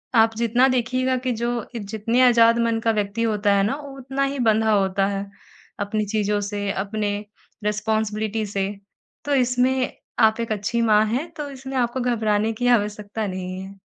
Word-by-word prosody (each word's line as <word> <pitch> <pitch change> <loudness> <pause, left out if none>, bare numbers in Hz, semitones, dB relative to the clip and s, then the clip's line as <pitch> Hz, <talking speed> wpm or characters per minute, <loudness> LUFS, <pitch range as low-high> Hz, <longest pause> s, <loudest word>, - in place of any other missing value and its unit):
आप 225 0 +4
जितना 235 +3 +3
देखिएगा 255 0 +1
कि 255 - +1
जो 235 0 0 0.3
जितने 220 +3 -1
आजाद 230 -1 +5
मन 230 -1 +1
का 225 - +4
व्यक्ति 205 +3 -3
होता 210 -2 +2
है 195 - +3
ना 215 +7 0
वो 275 -2 -10
उतना 270 +2 -2
ही 280 - -5
बँधा 220 0 +3
होता 195 -1 +2
है 200 0 -3 0.5
अपनी 210 +1 -1
चीज़ों 210 0 0
से 205 0 -3
अपने 205 +1 -2 0.5
रिस्पांसिबिलिटी 215 0 -1
से, 195 -1 -2 0.6
तो 290 - 0
इसमें 255 +1 +2 0.3
आप 220 -1 +4
एक 230 -1 -3
अच्छी 215 +3 -1
माँ 215 -2 +4
है 255 +9 -1
तो 290 -1 -4
इसमें 265 0 -6
आपको 245 +1 0
घबराने 220 -3 +1
की 245 +3 -1
आवश्यकता 210 -2 0
नहीं 185 0 -5
है। 195 +1 -10
220 Hz, 170 wpm, -23 LUFS, 205-245 Hz, 0.6 s, आजाद